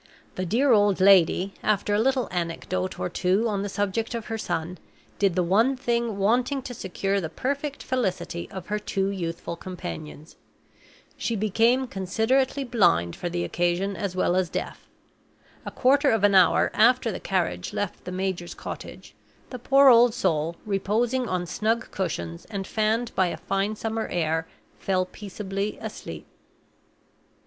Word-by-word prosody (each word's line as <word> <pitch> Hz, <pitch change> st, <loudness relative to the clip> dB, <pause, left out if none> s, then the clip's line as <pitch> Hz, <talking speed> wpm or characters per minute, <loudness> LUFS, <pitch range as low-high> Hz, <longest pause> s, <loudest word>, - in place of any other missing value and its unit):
The 185 Hz, 0 st, -3 dB
dear 255 Hz, +8 st, +3 dB
old 205 Hz, -3 st, +4 dB
lady, 190 Hz, 0 st, +5 dB
after 205 Hz, 0 st, +1 dB
a 205 Hz, -, +3 dB
little 260 Hz, +2 st, +1 dB
anecdote 180 Hz, +1 st, -3 dB
or -, -, -1 dB
two 185 Hz, +5 st, +1 dB
on 205 Hz, -3 st, -1 dB
the 205 Hz, -, -3 dB
subject 205 Hz, +4 st, -2 dB
of 230 Hz, -2 st, -4 dB
her -, -, -1 dB
son, 175 Hz, -2 st, -3 dB, 0.4 s
did 195 Hz, -4 st, +2 dB
the 180 Hz, -, +2 dB
one 225 Hz, +10 st, +3 dB
thing 235 Hz, -4 st, -1 dB
wanting 245 Hz, +7 st, +1 dB
to 245 Hz, -, -6 dB
secure 195 Hz, -1 st, -2 dB
the 160 Hz, -, -4 dB
perfect 280 Hz, -, -3 dB
felicity 190 Hz, -8 st, -2 dB
of 190 Hz, -2 st, -7 dB
her 210 Hz, 0 st, -2 dB
two 195 Hz, -1 st, -1 dB
youthful 170 Hz, -2 st, -4 dB
companions: 165 Hz, -4 st, -8 dB, 0.8 s
she 230 Hz, -, -1 dB
became 225 Hz, +5 st, +2 dB
considerately 240 Hz, +7 st, 0 dB
blind 175 Hz, -, +2 dB
for 175 Hz, -, -4 dB
the 175 Hz, 0 st, -2 dB
occasion, 175 Hz, +3 st, 0 dB
as 195 Hz, -3 st, -3 dB
well 180 Hz, -1 st, +1 dB
as 185 Hz, -2 st, +1 dB
deaf. -, -, -5 dB, 0.8 s
A -, -, -1 dB
quarter 280 Hz, +2 st, +3 dB
of 225 Hz, -3 st, +1 dB
an 205 Hz, -1 st, +5 dB
hour 190 Hz, -2 st, +5 dB
after -, -, +4 dB
the -, -, -5 dB
carriage 90 Hz, 0 st, -1 dB
left 205 Hz, -3 st, -4 dB
the 180 Hz, -, -6 dB
major's 185 Hz, -2 st, -3 dB
cottage, -, -, -8 dB, 0.4 s
the 250 Hz, -, -6 dB
poor 275 Hz, +3 st, +6 dB
old 240 Hz, -1 st, +6 dB
soul, 165 Hz, -7 st, 0 dB
reposing 225 Hz, +5 st, 0 dB
on 180 Hz, -1 st, -1 dB
snug 225 Hz, +6 st, -1 dB
cushions, 85 Hz, -, -4 dB
and 200 Hz, -3 st, -5 dB
fanned 220 Hz, +3 st, 0 dB
by 190 Hz, -1 st, +2 dB
a -, -, -4 dB
fine 195 Hz, +2 st, -1 dB
summer 225 Hz, +1 st, -3 dB
air, 160 Hz, -1 st, -1 dB, 0.3 s
fell 185 Hz, -1 st, 0 dB
peaceably 200 Hz, +1 st, -5 dB
asleep. -, -, -7 dB
200 Hz, 155 wpm, -25 LUFS, 180-230 Hz, 0.8 s, poor